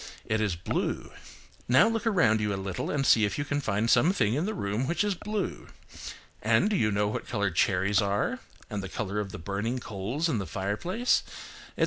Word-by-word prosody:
It 110 0 0
is 105 -5 0
blue. 85 - -3 0.6
Now 130 - +6
look 225 0 -1
around 115 - +3
you 105 -1 0
a - - -1
little 95 -1 -4
and 140 -2 0
see 110 -3 +5
if 105 - 0
you 145 - -2
can 145 0 -1
find 110 -2 0
some 160 +8 +5
thing 110 - +1
in 155 +9 0
the 220 - -2
room 105 - -2
which 170 +3 +1
is 205 -1 +1
blue. 210 +2 -4 0.7
And 115 - +3
do - - +2
you 105 - +2
know 105 +1 +1
what 105 - -4
colour 100 -4 0
cherries 95 +2 +2
are, 100 0 0 0.3
and 105 - -4
the 95 - -6
colour 105 +1 -3
of 100 -2 -3
the - - -6
burning 100 +7 -2
coals 115 - -2
in 145 -9 0
the 95 - -4
fireplace, 105 - 0 0.6
etc. - - -11
110 Hz, 210 wpm, -28 LUFS, 100-155 Hz, 0.7 s, Now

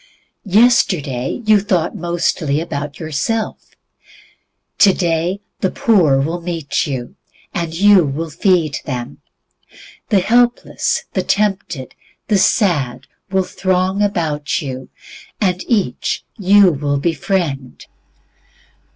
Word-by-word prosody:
Yesterday 185 - +2
you 215 -1 +5
thought 185 -5 -1
mostly 165 -4 -1
about 145 -3 -5
yourself. 170 +8 -3 1.0
Today 180 -1 +2 0.2
the 190 - +1
poor 175 - +3
will 165 +5 -2
meet 165 -5 -2
you, 130 -4 -5 0.4
and 170 -2 -2
you 200 0 +6
will 155 +3 -3
feed 165 -3 +1
them. 125 -3 -5 0.9
The 200 -3 +3
helpless, 240 +4 +1
the - - +1
tempted, 195 -10 -1 0.4
the 205 -3 +3
sad, 145 - +1 0.2
will 190 0 +1
throng 185 +1 -1
about 160 -8 -1
you, 130 -3 -6 0.5
and 185 -3 0
each 200 - -1
you 200 -1 +5
will 145 -1 -1
befriend. 150 -3 -2
170 Hz, 100 wpm, -18 LUFS, 145-195 Hz, 1.0 s, you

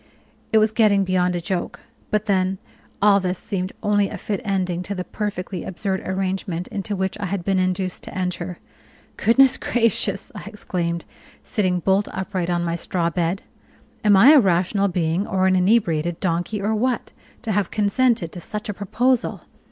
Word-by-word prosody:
It 220 - +5
was 215 0 +4
getting 210 -3 +4
beyond 180 -1 +1
a - - 0
joke: 175 +1 -3 0.3
but 210 0 0
then 190 -2 +1 0.5
all 205 -1 +6
this 185 -1 -2
seemed 185 -1 -3
only 205 -1 +2
a - - -6
fit 205 -2 -3
ending 185 -4 -1
to 200 +3 -4
the 180 - -3
perfectly 195 -2 -4
absurd 190 +1 -2
arrangement 190 -2 -2
into 205 +1 -3
which 190 +1 -2
I 200 - -2
had 190 -2 -3
been 195 -1 +2
induced 185 0 -1
to - - -8
enter. 180 -1 -3 0.6
"Goodness 260 +4 +4
gracious!" 230 -4 0
I - - -8
exclaimed, 175 -5 -3 0.4
sitting 185 -6 0
bolt 195 +3 +2
upright 190 -2 -3
on 175 -1 0
my 170 0 -1
straw 170 0 -1
bed, 175 +2 -1 0.6
"am 205 -2 +6
I 240 +9 +8
a 305 - +8
rational 190 0 +2
being 175 +1 0
or 190 -1 +1
an 190 0 +4
inebriated 175 -4 +2
donkey, 175 +3 -1
or 215 +2 +1
what, 240 +3 -1 0.3
to 220 - -2
have 205 -3 +1
consented 210 -3 +1
to 180 - -8
such 210 +4 -5
a - - -1
proposal? 240 +6 0
190 Hz, 175 wpm, -22 LUFS, 180-210 Hz, 0.6 s, I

